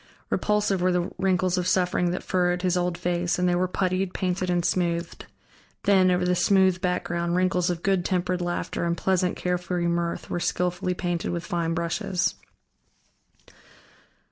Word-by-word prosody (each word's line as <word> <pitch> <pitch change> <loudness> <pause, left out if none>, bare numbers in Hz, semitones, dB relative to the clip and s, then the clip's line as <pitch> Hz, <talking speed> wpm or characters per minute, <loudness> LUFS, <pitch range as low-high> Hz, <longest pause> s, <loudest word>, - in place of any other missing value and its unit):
Repulsive 210 -3 +1
were 185 0 +3
the 180 0 -1
wrinkles 185 -1 +1
of 180 - -1
suffering 180 -1 +2
that 180 - -3
furrowed 180 -1 0
his 180 -1 +2
old 180 -1 0
face, 175 0 -1
and 180 0 +1
they 175 - +2
were 180 +1 +1
puttied, 185 0 -1
painted, 185 0 -1
and 175 -1 +1
smoothed; 170 -2 -1 0.6
then, 190 -2 +4
over 180 0 +2
the 180 - +2
smooth 190 0 +3
background, 175 -2 -1
wrinkles 180 -1 +1
of 175 -1 -3
good 195 -2 +2
tempered 180 0 -1
laughter 175 0 -2
and 170 0 0
pleasant, 185 -1 +1
carefree 180 -1 -1
mirth 170 0 -1
were 175 - -2
skillfully 180 +1 -1
painted 175 -2 -2
with 170 -1 -3
fine 165 -1 -1
brushes. 175 +2 -1
180 Hz, 160 wpm, -25 LUFS, 175-185 Hz, 0.6 s, then